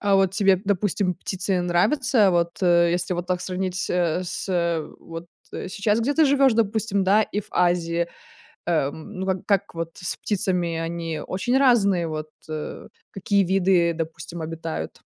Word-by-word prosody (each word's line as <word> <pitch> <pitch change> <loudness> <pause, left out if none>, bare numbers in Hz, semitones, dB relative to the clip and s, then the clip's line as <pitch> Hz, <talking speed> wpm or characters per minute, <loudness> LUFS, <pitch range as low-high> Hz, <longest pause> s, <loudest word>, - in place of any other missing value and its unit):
А 200 -1 +2
вот 190 -1 +3
тебе, 195 -2 +3
допустим, 195 -1 0
птицы 190 +1 -2
нравятся? 210 +5 +3
Вот, 170 +1 0
э, 170 -1 +4
если 175 +1 -1
вот 175 0 -4
так 180 -1 -1
сравнить, 185 0 -3
э, 180 0 +1
с, 170 -3 -1
вот, 165 +1 -8 0.3
э, - - -5
сейчас, 210 +3 0
где 270 +6 0
ты 320 0 +5
живёшь, 275 -2 +4
допустим, 215 -3 +1
да, 205 +3 +4
и 210 - -3
в - - -14
Азии, 170 -1 +1 0.6
эм, 160 +4 -1
ну, 190 - -2
как 190 -1 -2
как 200 -2 0
вот 165 0 -4
с 175 - -3
птицами? 180 -5 0
Они 165 -1 -3
очень 240 +8 -1
разные. 200 -10 +3
Вот, 155 0 -5 0.2
э, 155 -1 -6 0.2
какие 200 +1 +1
виды, 180 -2 +2
допустим, 160 +1 -6
обитают 165 0 -5
180 Hz, 160 wpm, -24 LUFS, 170-200 Hz, 0.6 s, ты